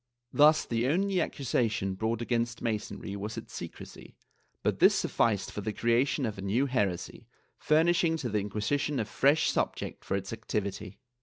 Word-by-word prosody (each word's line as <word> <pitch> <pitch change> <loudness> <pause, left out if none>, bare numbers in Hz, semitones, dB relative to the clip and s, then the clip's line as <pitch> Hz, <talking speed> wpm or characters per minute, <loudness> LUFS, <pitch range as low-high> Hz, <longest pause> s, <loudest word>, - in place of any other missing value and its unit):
Thus 150 +1 +5
the 115 +1 0
only 185 +4 +1
accusation 115 -10 -1
brought 110 +4 -2
against 115 -1 -1
Masonry 110 -3 -3
w^as 100 +2 -5
its - - -8
secrecy, - - -9 0.5
but - - 0
this - - +6
sufficed 105 -5 +1
for 105 - -5
the 110 - -2
creation 120 +5 +1
of 105 -3 -4
a - - -5
new 105 +8 +1
heresy, 105 -10 -2 0.3
furnishing 165 +1 +3
to 135 -6 -3
the 105 0 0
Inquisition 120 +8 -1
a 110 - 0
fresh 140 +8 +3
subject - - -2
for 95 - -1
its 95 +2 -5
activity. 100 -3 -4
115 Hz, 160 wpm, -29 LUFS, 105-140 Hz, 0.5 s, this